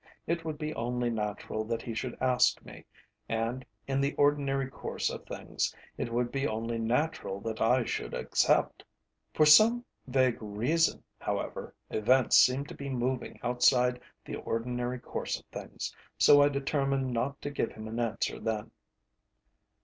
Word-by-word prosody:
It 170 0 -1
would 155 -2 -4
be 155 +1 -3
only 120 0 -1
natural 110 0 -3
that 115 +1 -3
he 115 - -5
should 120 +2 -4
ask 130 -1 +3
me, - - -12 0.4
and, 115 +3 -1 0.2
in 135 0 0
the 140 +1 0
ordinary 140 -2 +2
course 135 - -3
of - - -8
things, - - -3 0.2
it 115 - -4
would 120 +1 0
be 135 +1 0
only 115 +1 -2
natural 115 -3 -1
that 110 0 -4
I 125 +3 +4
should - - -3
accept. - - +1 0.5
For 155 - +5
some 225 +11 +7 0.2
vague 130 -2 +2
reason, 120 +11 +1 0.2
however, - - -4 0.2
events 125 +4 +3
seemed 130 +3 +4
to - - -8
be 140 0 -6
moving 130 0 -2
outside 125 0 +3 0.2
the - - -5
ordinary 125 +2 -2
course - - -4
of - - -23
things, - - -6 0.2
so 145 - +7
I 145 - +5
determined 135 -2 0
not 130 +4 -1
to 145 - -3
give 140 - -1
him 110 0 -8
an 115 +2 -4
answer 115 -2 -1
then. 110 -2 -3
125 Hz, 155 wpm, -30 LUFS, 115-140 Hz, 0.5 s, some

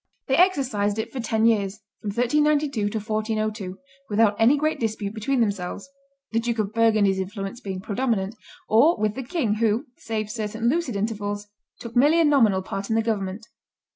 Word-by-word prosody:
They 265 - +2
exercised 260 - +2
it 220 - -3
for 265 - -4
ten 225 -1 +1
years, 210 -2 +1 0.2
from 210 - -4
1392 280 0 +1
to 220 - -3
1402, 215 -2 -2 0.3
without 210 0 +3
any 240 +6 +5
great 310 +2 0
dispute 215 -3 -2
between 240 +4 0
themselves 200 -1 -2 0.4
the 230 - +1
Duke 235 0 -2
of 210 -1 -1
Burgundy's 215 -4 +3
influence 195 +3 -5
being 190 -2 -5
predominant 215 -1 -1 0.3
or 275 +10 +5
with 210 -1 0
the 265 - -5
king, 250 - -1
who, 225 +1 +1
save 215 -2 -4
certain 220 0 -2
lucid 290 -5 -1
intervals, 205 0 -3 0.3
took 235 0 -9
merely 295 +7 +5
a 330 - +5
nominal 225 -10 +4
part 195 +2 -5
in 220 - +1
the 225 - +2
government. 210 -1 -2
220 Hz, 170 wpm, -24 LUFS, 205-240 Hz, 0.4 s, any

